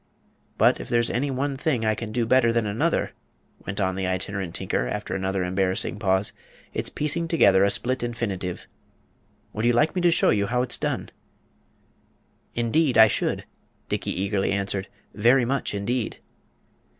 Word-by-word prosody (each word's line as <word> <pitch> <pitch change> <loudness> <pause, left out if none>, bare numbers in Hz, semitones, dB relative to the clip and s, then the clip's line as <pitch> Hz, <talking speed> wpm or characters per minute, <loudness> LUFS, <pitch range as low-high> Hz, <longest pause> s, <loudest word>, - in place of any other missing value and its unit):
But - - +4
if - - -8
there's 120 -1 +2
any 135 +4 0
one 135 +1 -1
thing 135 -3 0
that 110 - +1
I - - +3
can 110 0 -5
do 115 +1 0
better 120 0 +4
than 115 -1 +1
another," 105 +1 0 0.6
went 100 +2 -3
on 95 -1 +1
the 95 0 -2
Itinerant 95 -1 -3
Tinker, 60 - -1
after 105 +9 -4
another 95 0 -1
embarrassing 95 +2 -1
pause, 95 -1 +1 0.4
"it's - - -2
piecing 160 +3 -1
together 100 - +5
a 100 - +4
split 125 +6 -1
infinitive. 105 -7 -3 0.9
Would 110 +2 -2
you 120 - +4
like 150 +7 +3
me 185 - -1
to 175 - +5
show 170 - +3
you 100 -1 +1
how 125 +2 +1
it's 125 - -2
done?" - - -2 1.4
"Indeed, 120 +3 +2
I 110 - +10
should," - - -1 0.4
Dickey - - -2
eagerly 95 0 0
answered; 100 -1 -1 0.3
"very 120 +4 +4
much, 135 -4 -1
indeed." 115 +4 -2
110 Hz, 165 wpm, -25 LUFS, 95-125 Hz, 1.4 s, I